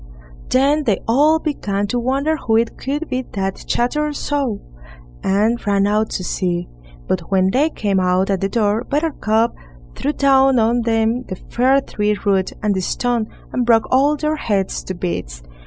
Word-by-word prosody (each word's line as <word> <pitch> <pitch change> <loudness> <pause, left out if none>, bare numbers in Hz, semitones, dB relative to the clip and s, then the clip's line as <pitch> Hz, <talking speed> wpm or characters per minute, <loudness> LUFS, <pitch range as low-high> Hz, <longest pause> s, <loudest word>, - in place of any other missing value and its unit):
Then 285 +3 +2
they 210 -4 +1
all 295 +7 +4
began 205 -11 -2
to 245 - 0
wonder 275 +6 0
who 225 -7 +1
it 230 0 0
could 295 +4 -3
be 255 -1 -2
that 195 -1 -3
chattered 300 +5 0
so, 275 -9 -2 0.6
and 215 +5 +1
ran 200 -1 +3
out 210 +1 +1
to 185 - -3
see. 175 -1 -2 0.4
But 175 -3 -2
when 190 -1 +2
they 290 +7 +2
came 200 -9 -1
out 185 +1 +1
at 195 - -1
the 195 - 0
door, 215 +1 +1
Buttercup 245 -7 0 0.4
threw 290 - -2
down 270 -2 +4
on 235 +1 +2
them 230 +2 0
the 185 - -5
fir 260 +8 +1
tree 210 -4 -1
root 195 -2 +1
and 210 -1 +2
the 190 - -1
stone, 235 +3 -1 0.3
and 250 - +1
broke 230 -2 +4
all 280 +3 +4
their 305 +1 -1
heads 200 -8 -1
to 185 - -4
bits. - - -4
225 Hz, 170 wpm, -19 LUFS, 195-270 Hz, 0.6 s, all